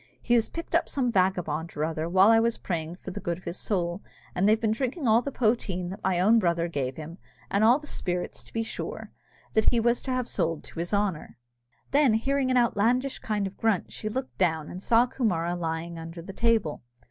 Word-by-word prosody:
He 240 Hz, -, 0 dB
has 230 Hz, -2 st, +3 dB
picked 335 Hz, 0 st, -7 dB
up 335 Hz, -, +2 dB
some 255 Hz, -4 st, 0 dB
vagabond 175 Hz, -5 st, 0 dB
or 150 Hz, -, +1 dB
other, 160 Hz, 0 st, -3 dB
while 190 Hz, +4 st, +6 dB
I 225 Hz, -, +6 dB
was 230 Hz, 0 st, +1 dB
praying 165 Hz, -2 st, -3 dB
for 190 Hz, -, -8 dB
the -, -, -5 dB
good 170 Hz, -1 st, -2 dB
of 185 Hz, -, -16 dB
his 170 Hz, +2 st, -5 dB
soul, 175 Hz, -2 st, -1 dB, 0.3 s
and 195 Hz, +3 st, +2 dB
they've 220 Hz, +1 st, +4 dB
been 220 Hz, -2 st, +1 dB
drinking 260 Hz, +5 st, -2 dB
all 225 Hz, +2 st, +5 dB
the 280 Hz, -, -4 dB
poteen 215 Hz, -8 st, 0 dB
that 195 Hz, -, -9 dB
my 185 Hz, -2 st, +1 dB
own 220 Hz, +5 st, +5 dB
brother 170 Hz, -3 st, +1 dB
gave 135 Hz, -6 st, -3 dB
him, 160 Hz, +3 st, -8 dB, 0.3 s
and 200 Hz, +2 st, +2 dB
all 235 Hz, +4 st, +6 dB
the 300 Hz, -, -11 dB
spirits, 180 Hz, -10 st, -3 dB
to -, -, -13 dB
be 225 Hz, -, -1 dB
sure, -, -, -6 dB, 0.4 s
that 220 Hz, -, +4 dB
he 235 Hz, -, +1 dB
was 235 Hz, +1 st, +2 dB
to 265 Hz, -, -4 dB
have 255 Hz, -1 st, -1 dB
sold 165 Hz, -4 st, -1 dB
to -, -, -9 dB
his 170 Hz, +1 st, -3 dB
honour." 200 Hz, -6 st, -1 dB, 0.5 s
Then 280 Hz, -6 st, +4 dB
hearing 270 Hz, +3 st, +1 dB
an 255 Hz, -, +3 dB
outlandish 245 Hz, +3 st, +2 dB
kind 210 Hz, -2 st, -1 dB
of 195 Hz, -, -5 dB
a -, -, -31 dB
grunt, 220 Hz, -5 st, +1 dB
she 215 Hz, -, -4 dB
looked 255 Hz, +4 st, -5 dB
down, 160 Hz, -4 st, +1 dB
and 180 Hz, -, -7 dB
saw 230 Hz, +3 st, +4 dB
Coomara 175 Hz, -9 st, -1 dB
lying 165 Hz, 0 st, -4 dB
under 165 Hz, +1 st, -8 dB
the 195 Hz, -, -8 dB
table. 225 Hz, -8 st, +1 dB
200 Hz, 230 wpm, -27 LUFS, 170-235 Hz, 0.5 s, while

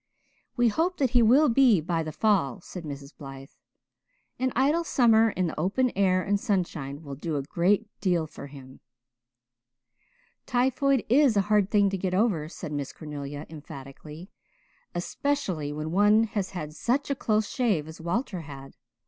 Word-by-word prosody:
"We 240 Hz, -1 st, +4 dB
hope 340 Hz, -, 0 dB
that 265 Hz, -4 st, +1 dB
he 245 Hz, -2 st, +4 dB
will 260 Hz, +7 st, +5 dB
be 240 Hz, -5 st, +5 dB
by 165 Hz, +1 st, -1 dB
the 155 Hz, -1 st, -4 dB
fall," 170 Hz, -, +1 dB
said 175 Hz, -1 st, -9 dB
Mrs. 140 Hz, 0 st, -8 dB
Blythe. 135 Hz, -1 st, -10 dB, 0.9 s
"An 260 Hz, 0 st, 0 dB
idle 290 Hz, +7 st, +2 dB
summer 225 Hz, -7 st, +4 dB
in 185 Hz, -3 st, -1 dB
the 160 Hz, -, -4 dB
open 235 Hz, +9 st, +1 dB
air 185 Hz, -1 st, +2 dB
and 205 Hz, 0 st, 0 dB
sunshine 165 Hz, -8 st, -2 dB
will 140 Hz, -2 st, -7 dB
do 150 Hz, +3 st, -4 dB
a 140 Hz, -, -1 dB
great 185 Hz, +8 st, +1 dB
deal 175 Hz, -5 st, +1 dB
for 150 Hz, -2 st, -10 dB
him." 135 Hz, -2 st, -13 dB, 1.7 s
"Typhoid 260 Hz, +1 st, +1 dB
is 255 Hz, -2 st, +4 dB
a -, -, +5 dB
hard 205 Hz, -2 st, +3 dB
thing 205 Hz, -2 st, +3 dB
to 195 Hz, -, -2 dB
get 185 Hz, 0 st, -1 dB
over," 185 Hz, -8 st, +1 dB
said 155 Hz, -, -8 dB
Miss 145 Hz, -2 st, -3 dB
Cornelia 145 Hz, -1 st, -7 dB
emphatically, 150 Hz, +3 st, -11 dB, 0.6 s
"especially 175 Hz, -, -2 dB
when 155 Hz, +1 st, -4 dB
one 205 Hz, +4 st, +4 dB
has 205 Hz, -3 st, -2 dB
had 155 Hz, -5 st, -6 dB
such 260 Hz, -, -1 dB
a -, -, +1 dB
close 215 Hz, -4 st, 0 dB
shave 210 Hz, -, 0 dB
as 160 Hz, +1 st, -10 dB
Walter 180 Hz, +2 st, -2 dB
had. 135 Hz, -3 st, -10 dB
185 Hz, 165 wpm, -27 LUFS, 150-230 Hz, 1.7 s, will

